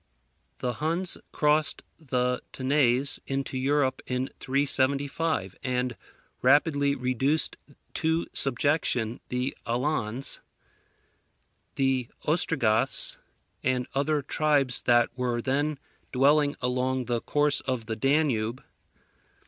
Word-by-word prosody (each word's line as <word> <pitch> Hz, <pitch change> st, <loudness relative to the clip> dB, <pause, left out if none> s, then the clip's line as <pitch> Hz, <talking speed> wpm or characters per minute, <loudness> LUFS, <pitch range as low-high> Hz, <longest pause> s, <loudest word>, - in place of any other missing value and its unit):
The 125 Hz, -1 st, -2 dB
Huns 170 Hz, +4 st, 0 dB, 0.2 s
crossed 150 Hz, 0 st, +1 dB, 0.2 s
the 125 Hz, -4 st, -1 dB
Tanais 130 Hz, 0 st, +3 dB
into 135 Hz, 0 st, -3 dB
Europe 135 Hz, 0 st, +1 dB
in 125 Hz, +1 st, -2 dB
375, 140 Hz, -, 0 dB
and 125 Hz, -1 st, -1 dB, 0.5 s
rapidly 140 Hz, +1 st, +3 dB
reduced 130 Hz, +4 st, +1 dB, 0.4 s
to 160 Hz, 0 st, 0 dB
subjection 125 Hz, -4 st, +1 dB
the 125 Hz, +1 st, -2 dB
Alans, 125 Hz, -1 st, -2 dB, 1.3 s
the 135 Hz, -3 st, 0 dB
Ostrogoths, 135 Hz, -9 st, +2 dB, 0.4 s
and 125 Hz, -1 st, 0 dB
other 145 Hz, +2 st, 0 dB
tribes 145 Hz, -3 st, +1 dB
that 120 Hz, 0 st, +3 dB
were 125 Hz, -2 st, -1 dB
then 145 Hz, +4 st, 0 dB, 0.3 s
dwelling 145 Hz, +2 st, +3 dB
along 125 Hz, 0 st, 0 dB
the 120 Hz, -1 st, -1 dB
course 145 Hz, 0 st, +2 dB
of 130 Hz, -4 st, -3 dB
the 110 Hz, -, -3 dB
Danube. 130 Hz, -3 st, +1 dB
135 Hz, 95 wpm, -27 LUFS, 125-145 Hz, 1.3 s, Tanais